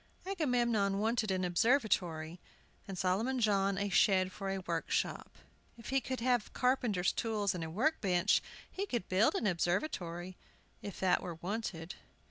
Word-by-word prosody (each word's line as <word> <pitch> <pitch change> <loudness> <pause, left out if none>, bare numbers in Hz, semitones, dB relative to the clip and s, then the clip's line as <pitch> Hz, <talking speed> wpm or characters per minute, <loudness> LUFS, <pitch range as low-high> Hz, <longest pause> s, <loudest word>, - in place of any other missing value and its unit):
Agamemnon 240 - +1
wanted 220 +1 0
an 185 -1 0
observatory, 175 - +1 0.5
and 195 -2 -6
Solomon 210 +9 0
John 200 -3 +2
a 200 +1 0
shed 185 0 +3
for 195 0 -5
a 195 - -1
workshop. - - -2 0.4
If 230 - -10
he 270 0 +2
could 260 -2 -4
have 245 -2 +1
carpenters' 240 -8 +1
tools 210 -3 -1
and 175 -2 -4
a 160 - -4
workbench 190 - +2 0.3
he 400 +2 -3
could 240 - -2
build 190 +4 +3
an - - -1
observatory, 175 - -1 0.4
if 200 -2 -7
it 185 - +3
were 175 -2 -5
wanted. 180 -2 -4
200 Hz, 145 wpm, -33 LUFS, 180-235 Hz, 0.5 s, shed